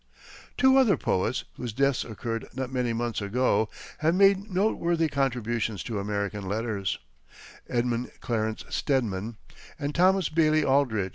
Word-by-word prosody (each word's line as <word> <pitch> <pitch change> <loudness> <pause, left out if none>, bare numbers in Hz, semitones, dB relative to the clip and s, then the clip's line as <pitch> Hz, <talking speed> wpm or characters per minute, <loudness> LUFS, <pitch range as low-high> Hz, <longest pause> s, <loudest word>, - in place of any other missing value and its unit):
Two 265 0 +5
other 230 - +5
poets, 110 +5 0
whose 120 -3 -5
deaths 140 +2 +1
occurred 115 0 -5
not 130 -1 -4
many 125 -2 0
months 115 -1 -2
ago, 110 0 +1 0.3
have 160 +2 +2
made 195 +1 +4
noteworthy 175 -4 +1
contributions 120 -7 -1
to 110 -4 -3
American 100 0 -3
letters 105 -2 -2 0.7
Edmund 120 0 -1
Clarence 110 -2 -2
Stedman 115 -5 -1 0.4
and 145 -1 -3
Thomas 185 +3 +4
Bailey 155 -1 +3
Aldrich. 125 -8 +2
125 Hz, 130 wpm, -27 LUFS, 110-155 Hz, 0.7 s, Two